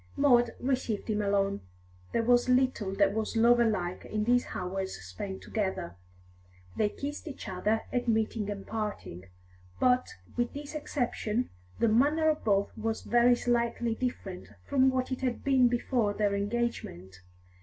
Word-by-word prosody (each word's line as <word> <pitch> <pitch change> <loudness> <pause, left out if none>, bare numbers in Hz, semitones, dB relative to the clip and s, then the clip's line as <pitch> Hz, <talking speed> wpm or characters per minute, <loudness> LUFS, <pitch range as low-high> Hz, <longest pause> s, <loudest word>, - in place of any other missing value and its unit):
Maud 245 -4 +4
received 245 -5 -1
him 210 0 0
alone. 200 -1 +1 0.5
There 230 - +1
was 245 +1 +3
little 250 -6 +2
that 200 0 +3
was 220 +1 -2
lover 235 0 +5
like 180 -4 -3
in 215 0 -2
these 245 +2 +2
hours 190 +1 -3
spent 95 - -7
together. 190 - -3 0.8
They 210 - +2
kissed 290 +7 -6
each 275 -6 -7
other 210 +4 0
at 245 -1 0
meeting 220 -2 0
and 200 -1 -5
parting, 210 - -5 0.5
but, 250 - +2 0.2
with 240 0 -1
this 290 +1 -7
exception, 250 -5 -2 0.3
the - - +2
manner 295 +8 +4
of 305 - -5
both 200 -2 +1
was 225 0 -3
very 240 +1 +4
slightly 235 -1 0
different 215 -6 -4 0.2
from 265 -2 +4
what 260 0 -1
it 260 - -3
had 250 -2 -2
been 265 -3 +4
before 240 -3 0
their 205 -1 +1
engagement. 200 - -3
230 Hz, 150 wpm, -29 LUFS, 200-250 Hz, 0.8 s, lover